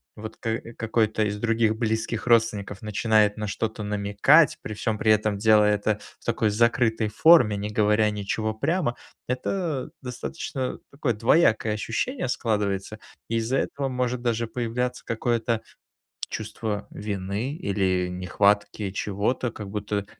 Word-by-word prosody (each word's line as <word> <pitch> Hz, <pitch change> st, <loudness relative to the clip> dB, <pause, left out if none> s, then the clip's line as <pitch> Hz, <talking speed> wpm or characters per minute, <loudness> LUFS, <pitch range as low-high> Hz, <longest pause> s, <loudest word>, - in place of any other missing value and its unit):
вот, 110 Hz, 0 st, -8 dB
ка 115 Hz, 0 st, -2 dB, 0.2 s
какой-то 110 Hz, -1 st, +1 dB
из 105 Hz, 0 st, -2 dB
других 115 Hz, -1 st, +2 dB
близких 110 Hz, +1 st, -2 dB
родственников 110 Hz, -3 st, +2 dB
начинает 105 Hz, 0 st, +2 dB
на 105 Hz, -1 st, -3 dB
что-то 110 Hz, +2 st, -3 dB
намекать, 105 Hz, +9 st, +3 dB
при 105 Hz, -, -6 dB
всём 110 Hz, -1 st, -2 dB
при 110 Hz, -, +3 dB
этом, 105 Hz, -1 st, +2 dB
делая 105 Hz, -1 st, +5 dB
это 105 Hz, +1 st, 0 dB, 0.2 s
в -, -, -23 dB
такой 110 Hz, -2 st, +1 dB
закрытой 115 Hz, 0 st, +2 dB
форме, 115 Hz, -3 st, +5 dB
не 105 Hz, +1 st, -3 dB
говоря 105 Hz, 0 st, +3 dB
ничего 110 Hz, +2 st, -2 dB
прямо, 140 Hz, +2 st, 0 dB, 0.3 s
это, 140 Hz, +2 st, -2 dB
э, -, -, -14 dB
достаточно, 130 Hz, +1 st, -4 dB
такое, 135 Hz, -5 st, -1 dB
двоякое 115 Hz, -2 st, +3 dB
ощущение 125 Hz, -, -2 dB
складывается. 105 Hz, -3 st, -1 dB, 0.3 s
И 115 Hz, -, 0 dB
из-за 115 Hz, +4 st, 0 dB
этого 140 Hz, -1 st, -2 dB
может 125 Hz, -1 st, -1 dB
даже 115 Hz, -1 st, 0 dB
появляться 125 Hz, +2 st, -3 dB
какое-то 115 Hz, 0 st, -1 dB, 0.7 s
чувство 110 Hz, -1 st, -4 dB
вины, 105 Hz, +6 st, -3 dB
или 95 Hz, -, 0 dB
нехватки 100 Hz, +2 st, 0 dB
чего-то, 105 Hz, +5 st, -1 dB
как-будто 105 Hz, -1 st, -4 dB
110 Hz, 135 wpm, -25 LUFS, 105-120 Hz, 0.7 s, делая